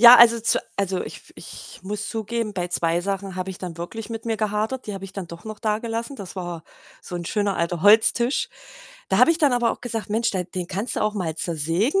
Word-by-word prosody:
Ja, 240 Hz, +1 st, +12 dB
also, 235 Hz, -1 st, +8 dB
zu 225 Hz, -, +3 dB, 0.2 s
also, 190 Hz, -2 st, 0 dB
ich -, -, -7 dB
f -, -, -16 dB
ich -, -, -10 dB
muss 205 Hz, +2 st, -4 dB
zugeben, 225 Hz, -1 st, -2 dB
bei 180 Hz, -2 st, -2 dB
2 170 Hz, -1 st, +1 dB
Sachen 195 Hz, 0 st, -3 dB
habe 185 Hz, +1 st, -3 dB
ich 185 Hz, -, -8 dB
dann 175 Hz, -3 st, -6 dB
wirklich 215 Hz, +6 st, -6 dB
mit 225 Hz, 0 st, -5 dB
mir 225 Hz, -, 0 dB
gehadert. 215 Hz, +4 st, -1 dB
Die 210 Hz, -, -4 dB
habe 195 Hz, 0 st, -6 dB
ich 195 Hz, -, -9 dB
dann 195 Hz, -3 st, -5 dB
doch 170 Hz, 0 st, -10 dB
noch 215 Hz, -1 st, -7 dB
dagelassen. 225 Hz, +4 st, -2 dB
Das 200 Hz, -6 st, -8 dB
war 175 Hz, -3 st, -5 dB, 0.4 s
so 175 Hz, -, -6 dB
'n 170 Hz, -, -5 dB
schöner 205 Hz, -2 st, 0 dB
alter 170 Hz, 0 st, -1 dB
Holztisch. 225 Hz, +4 st, +5 dB, 0.6 s
Da -, -, +2 dB
habe 330 Hz, -, +7 dB
ich 330 Hz, -, -3 dB
dann 290 Hz, -4 st, +4 dB
aber 240 Hz, -1 st, +2 dB
auch -, -, -9 dB
gesagt: 225 Hz, -5 st, -3 dB
„Mensch, 225 Hz, +2 st, +1 dB
der 185 Hz, -2 st, -1 dB
den 180 Hz, 0 st, -5 dB
kannst 200 Hz, +6 st, -1 dB
du -, -, -1 dB
auch 215 Hz, 0 st, +1 dB
mal 170 Hz, -6 st, -2 dB
zersägen 170 Hz, -, +1 dB
205 Hz, 240 wpm, -24 LUFS, 180-225 Hz, 0.6 s, Ja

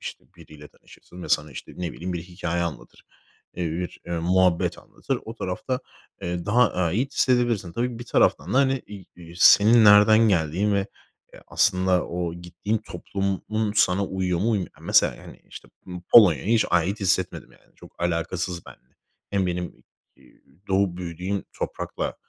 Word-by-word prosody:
İşte, -, -, -8 dB
biriyle 75 Hz, -1 st, -14 dB
tanışırsın 90 Hz, 0 st, -16 dB
ve -, -, -7 dB
sana, 75 Hz, -1 st, +1 dB
işte, -, -, -9 dB
ne 90 Hz, -2 st, -4 dB
bileyim, 90 Hz, +2 st, -5 dB
bir 85 Hz, -1 st, -4 dB
hikâye 85 Hz, -1 st, -3 dB
anlatır, 85 Hz, -3 st, -7 dB, 0.5 s
eee, 90 Hz, -, -4 dB
bir, 90 Hz, +2 st, -5 dB
eee, 85 Hz, -, -5 dB
muhabbet 90 Hz, 0 st, +1 dB
anlatır. -, -, -5 dB
O 115 Hz, -, -8 dB
tarafta, 120 Hz, +5 st, -4 dB, 0.4 s
eee, 85 Hz, 0 st, -4 dB
daha 120 Hz, +4 st, +3 dB
ait 95 Hz, -, -1 dB
hissedebilirsin. 120 Hz, -8 st, +1 dB
Tabii, 120 Hz, +4 st, -3 dB
bir 120 Hz, -, -8 dB
taraftan 95 Hz, -, +1 dB
da, -, -, +4 dB
hani, 135 Hz, -1 st, +2 dB
iii, 100 Hz, -3 st, -11 dB
iii, 85 Hz, -1 st, -13 dB
senin 110 Hz, +5 st, +7 dB
nereden 105 Hz, +1 st, +7 dB
geldiğin 95 Hz, +3 st, +1 dB
ve, 100 Hz, -1 st, 0 dB, 0.5 s
eee, -, -, -14 dB
aslında 95 Hz, -2 st, +1 dB
o 85 Hz, -1 st, -4 dB
gittiğin 85 Hz, +5 st, -4 dB
toplumun 105 Hz, +1 st, -3 dB
sana 95 Hz, -1 st, +2 dB
uyuyor 95 Hz, -2 st, -2 dB
mu, 110 Hz, +6 st, 0 dB
uymuyor 100 Hz, -5 st, -2 dB
mu. -, -, -13 dB
Mesela, -, -, +4 dB
yani, -, -, -14 dB
işte, -, -, -12 dB, 0.2 s
Po 90 Hz, -1 st, -8 dB
Polonya'ya 95 Hz, -, +7 dB
hiç 115 Hz, +1 st, +3 dB
ait 90 Hz, +5 st, +1 dB
hissetmedim, 95 Hz, -1 st, -1 dB
yani. -, -, -26 dB
Çok -, -, -13 dB
alakasız 85 Hz, +1 st, -2 dB
benimle. 65 Hz, -, -17 dB, 0.4 s
Hem 100 Hz, -2 st, 0 dB
benim, 90 Hz, 0 st, -2 dB
ııı, -, -, -12 dB, 0.9 s
doğup 95 Hz, -2 st, +1 dB
büyüdüğüm 90 Hz, +3 st, -4 dB
toprakla -, -, -4 dB
95 Hz, 165 wpm, -24 LUFS, 85-105 Hz, 0.9 s, senin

